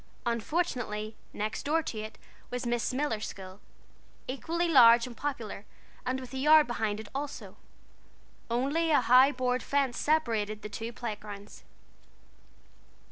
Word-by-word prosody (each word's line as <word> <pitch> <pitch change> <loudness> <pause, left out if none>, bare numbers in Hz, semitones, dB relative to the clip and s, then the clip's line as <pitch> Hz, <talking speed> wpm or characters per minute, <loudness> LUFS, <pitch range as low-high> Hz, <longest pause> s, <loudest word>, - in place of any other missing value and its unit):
Unfortunately, 235 -4 -2 0.2
next 215 +1 -3
door 320 +3 +1
to 225 - -5
it 215 0 -7 0.3
was 250 0 -4
Miss 240 -1 0
Miller's 255 -5 -1
school, 190 0 -9 0.7
equally 335 +6 -1
large 235 -6 +7
and 245 -2 -9
popular, 235 -8 -4 0.4
and 260 +1 0
with 255 -1 -10
a 265 - -3
yard 305 +2 +7
behind 220 -3 -2
it 220 - -8
also. 280 +1 -5 0.9
Only 280 +8 +1
a 300 - +5
high 255 +4 +6
board 250 -1 0
fence 275 -3 0
separated 225 -9 0
the 210 - -5
two 225 +3 -5
playgrounds. 210 -3 -7
245 Hz, 135 wpm, -29 LUFS, 215-285 Hz, 0.9 s, large